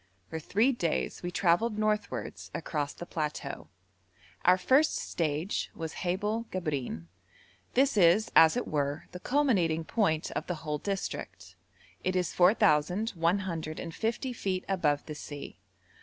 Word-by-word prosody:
For 160 - -3
three 215 - +2
days 170 - -1
we 175 - -3
travelled 195 +5 +2
northwards 130 - -2
across 150 -3 -2
the 175 - -8
plateau. 150 -4 -4 0.8
Our 180 +1 +6
first 265 +11 +3
stage 160 +3 -2
was 160 -1 -5
Haibel 210 +5 -1
Gabrein. 145 - -3 0.7
This 270 +1 +4
is, 190 +4 +5
as 160 +6 +7
it 245 - -2
were, 145 0 -1
the 180 - -7
culminating 190 - +2
point 160 -5 0
of - - -4
the 180 - -1
whole 150 -1 -1
district; 195 +2 -5 0.5
it 185 0 0
is 180 -2 0
4,150 180 - +1
feet 190 -5 -2
above 150 -7 +1
the 155 - -6
sea. 145 -1 -8
175 Hz, 125 wpm, -30 LUFS, 155-210 Hz, 0.8 s, as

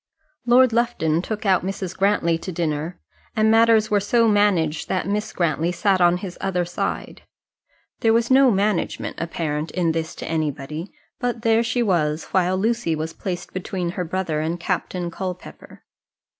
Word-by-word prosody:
Lord 250 0 +5
Lufton 225 -9 +1
took 215 +3 -5
out 190 -3 +3
Mrs. 190 -1 -4
Grantly 195 -4 +2
to 185 - -6
dinner, 160 0 -3 0.4
and 220 -1 +3
matters 225 -1 +4
were 205 - +4
so 230 +3 +2
managed 195 -8 +2
that 185 - -1
Miss 210 +2 -1
Grantly 165 0 0
sat 190 +1 +1
on 175 0 +5
his 185 -1 -8
other 180 -2 0
side. 175 - -4 0.8
There 225 - +3
was 230 +2 +2
no 265 0 +6
management 205 -2 -1
apparent 160 -2 -3
in 175 -3 0
this 160 0 -3
to - - -7
anybody; 155 +1 -3 0.3
but 245 -2 -2
there 225 -1 +4
she 235 +1 0
was, 160 -6 +1
while 185 0 +2
Lucy 220 -4 0
was 155 +1 -4
placed 180 -1 -5
between 185 -2 -3
her 180 - -3
brother 175 -3 -2
and 165 +3 -2
Captain 180 0 -2
Culpepper. 185 0 -8
185 Hz, 160 wpm, -22 LUFS, 165-215 Hz, 0.8 s, no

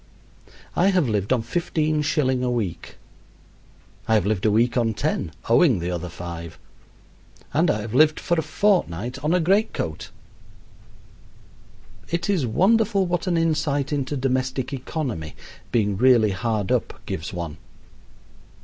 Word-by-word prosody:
I 180 - +3
have 185 -7 +3
lived 105 -2 -1
on 125 -3 +2
15 155 +2 0
shilling 135 -4 +1
a 125 - +1
week. 100 -9 -3 1.1
I 110 - +3
have 105 -4 +2
lived 105 -1 0
a - - +3
week 115 +3 +2
on 115 -3 +1
10, 90 -4 -1 0.2
owing 120 - +4
the 90 +1 -3
other 90 0 -4
5; 85 -1 -8 1.0
and 165 +3 +3
I 105 - +1
have 110 +1 -6
lived 155 +4 +4
for - - -1
a 165 - +2
fortnight 145 - 0
on 150 - +1
a - - +3
great 195 +6 +2
coat. 80 - -4 2.0
It 170 +3 -1
is 165 -11 +1
wonderful 200 - +3
what 175 +1 -2
an 175 -2 +1
insight 150 -3 0
into 140 0 -2
domestic 130 0 -1
economy 125 - -4 0.4
being 105 -4 +1
really 120 -3 +5
hard 105 0 -2
up - - -1
gives 80 +1 -5
one. 85 -4 -5
130 Hz, 145 wpm, -23 LUFS, 105-160 Hz, 2.0 s, really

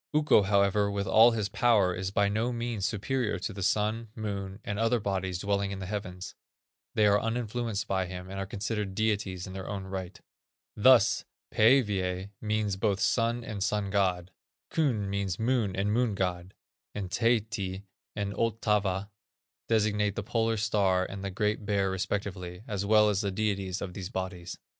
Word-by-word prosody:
Ukko, 150 -7 +5
however, 100 +1 +2
with 100 0 -2
all 110 +4 +7
his 110 -4 -1
power, 105 -4 +3
is 95 +1 -3
by 100 +1 +2
no 110 +4 0
means 115 -5 -2
superior 120 +4 -1
to 110 - -4
the 100 - -7
Sun, 110 +4 0
Moon, 100 -2 -4
and 105 0 -3
other 115 +1 +2
bodies 95 -3 -2
dwelling 100 +1 0
in 100 - -4
the 95 - -6
heavens; 90 -2 -5 0.6
they 105 - +4
are 105 0 +4
uninfluenced 115 -2 -2
by 95 -1 0
him, 90 0 -7
and 95 +1 -6
are 95 - -3
considered 105 -2 -3
deities 100 -4 -1
in 95 - -8
their 95 -1 -6
own 100 -2 -4
right. 95 -1 -6 0.6
Thus, 120 0 +5 0.3
Pæivæ 100 -6 +3
means 105 -2 -1
both 100 -1 +1
sun 115 +4 +1
and 105 -3 -6
sun 105 -1 -1
god; 95 -3 0 0.4
Kun 125 -11 +1
means 100 -2 -2
moon 115 -5 0
and 100 +2 0
moon 120 -3 +1
god; 90 -1 -3 0.4
and 95 -3 -4
Taehti 105 -4 0 0.3
and 100 -1 -2
Ottava 105 -3 0 0.6
designate 105 -2 +1
the - - -3
Polar 115 -1 0
star 100 -4 +2
and 100 +1 -7
the 100 - -2
Great 105 +2 -1
Bear 100 -2 +1
respectively, 95 -1 -3
as 100 -2 -2
well 105 0 +6
as 105 -1 +1
the 100 - -1
deities 95 -2 -2
of 90 - -6
these 95 -1 -6
bodies. 95 -3 -5
100 Hz, 170 wpm, -29 LUFS, 95-110 Hz, 0.6 s, all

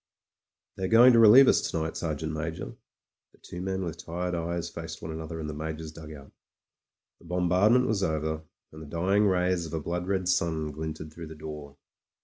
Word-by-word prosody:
"They 95 - -2
are - - 0
going 120 +5 +7
to 115 - +6
relieve 115 +5 +9
us - - +4
to - - -3
night, 80 0 -3
Sergeant 80 -1 -3
Major.*' 80 +1 -5 0.6
The - - -23
two 90 - -8
men 95 0 -2
with 85 0 -6
tired 90 +2 -3
eyes 85 0 -2
faced 80 -1 -7
one 80 - -6
another 80 +1 -6
in 80 - -4
the 75 - -5
Major's 80 +1 -5
dugout 75 -3 -11 0.9
The - - -20
bombardment 90 +8 +3
was 110 -5 0
over, 80 -2 -1 0.3
and 80 - -11
the 80 - -9
dying 95 +7 +2
rays 90 -2 +1
of 80 - -10
a - - -1
blood 90 +3 -4
red 95 -2 -1
sun 80 -3 0
glinted 80 0 -6
through 85 -1 -8
the 80 - -10
door. 75 -2 -9
85 Hz, 195 wpm, -28 LUFS, 80-90 Hz, 0.9 s, relieve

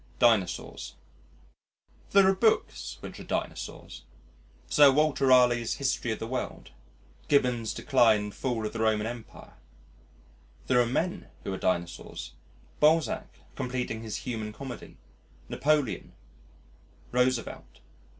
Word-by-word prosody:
Dinosaurs 110 -7 +1 1.1
There 195 -1 +6
are 190 - +5
books 220 +3 0
which - - -8
are - - -8
Dinosaurs - - -5 0.7
Sir 145 -2 +7
Walter 150 -1 +2
Raleigh's 125 -2 +4
History 130 -3 -1
of 110 - -2
the - - -5
World, 125 +2 -5 0.6
Gibbon's 125 -5 +2
Decline 120 -5 +3
and 105 0 -5
Fall 120 -4 -2
of 105 - -4
the 115 - -5
Roman 110 -1 +2
Empire. 115 0 -8 1.1
There 125 -1 +4
are 120 - +1
men 165 +9 -2 0.2
who 100 - -3
are - - -3
Dinosaurs 85 -3 -3 0.5
Balzac 155 -4 +3 0.3
completing 125 -3 -3
his 110 -2 -6
Human 110 -4 -3
Comedy, 130 +1 -9 0.5
Napoleon, 145 -5 0 1.0
Roosevelt. 125 -1 -1
125 Hz, 115 wpm, -28 LUFS, 110-135 Hz, 1.1 s, Sir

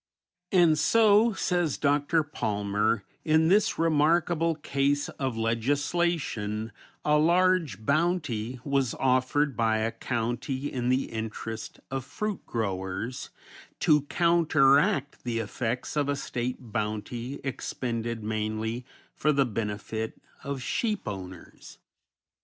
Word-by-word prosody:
And 170 -5 +5
so, 220 +4 +5
says 175 -5 0
Dr. 145 +3 +2
Palmer, 105 -5 -1 0.2
"In 160 0 +3
this 210 +3 +3
remarkable 165 +1 +2
case 145 -1 0
of 130 -4 -3
legislation 115 -2 0 0.3
a 150 0 +4
large 170 - +2
bounty 140 -7 0
was 135 -4 0
offered 130 +2 +1
by 110 -1 +2
a 110 +1 0
county 120 +4 -3
in 125 -1 -1
the 130 +1 +1
interest 110 0 -5
of 135 -1 -2
fruit 205 - -4
growers 100 +2 -3 0.5
to 150 -3 +5
counteract 150 -4 +3
the 120 -2 -2
effects 120 +4 -3
of 145 -1 +1
a 145 - +1
State 125 -3 -4
bounty 110 +4 -3
expended 115 -4 -3
mainly 110 +2 -2 0.3
for 150 - +1
the 140 -2 +3
benefit 110 0 -4 0.2
of 140 -2 -4
sheep 210 - -1
owners!" 95 -3 -8
130 Hz, 110 wpm, -28 LUFS, 115-155 Hz, 0.5 s, And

